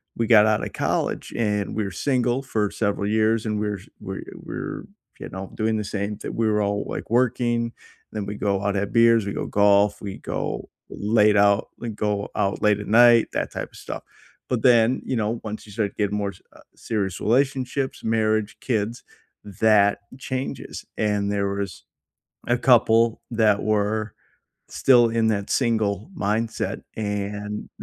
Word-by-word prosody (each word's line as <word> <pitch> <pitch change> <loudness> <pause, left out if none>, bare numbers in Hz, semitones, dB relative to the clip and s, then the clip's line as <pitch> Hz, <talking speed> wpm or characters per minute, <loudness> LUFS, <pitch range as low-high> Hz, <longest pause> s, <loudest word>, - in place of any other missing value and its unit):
we 115 - 0
got 110 -2 +7
outta 110 -1 +1
college, - - -2
and 105 -3 -1
we 110 - 0
were 95 - -4
single 125 - 0
for 105 -6 -1
several 100 -1 -1
years, 110 +1 +2
and 105 -1 -1
we're 105 -2 -2 0.2
we're 95 -1 -6
we're, - - -6 0.3
you - - -7
know, 95 +1 -7
doing 110 0 0
the 105 - -2
same 100 0 -3
thin - - -6
we 115 -1 +1
were 105 -1 +2
all, 100 0 -1
like, - - -6
working, 120 -1 +1 0.4
then 105 -2 -4
we 105 - -4
go 100 -1 -1
out, 100 -1 +1
have 100 +1 -1
beers, 115 -2 +5
we - - -2
go - - -3
golf, 100 0 +3
we 100 -2 -6
go - - -4 0.2
late 105 0 +3
out 100 +1 +3
and 115 -3 -5
go 105 -1 -1
out 100 -2 0
late 105 -1 +3
at 105 - -7
night, 120 +1 +6
that - - -2
type - - -5
of - - -18
stuff. - - -6 0.5
But 125 -3 0
then, 120 -1 +4
you 130 - -1
know, 110 +2 -1
once 110 0 -6
you 105 - -13
start 105 -2 -2
getting 105 0 0
more 100 -1 -1
s 95 - -19
uh, - - -16
serious 100 -5 -3
relationships, 130 +2 0
marriage, 110 -1 0
kids, 115 -1 -2 0.4
that 100 0 +3 0.2
changes. 130 0 -5
And 105 -1 0
there 100 -1 0
was 100 -2 -4 0.6
a 120 - +3
couple 115 -2 +4
that 110 -3 +3
were 110 0 0 0.6
still 120 -3 +4
in 115 -1 +1
that 100 -2 -1
single 110 - 0
mindset, 110 +3 -1
and 105 0 -4
105 Hz, 170 wpm, -23 LUFS, 100-115 Hz, 0.6 s, got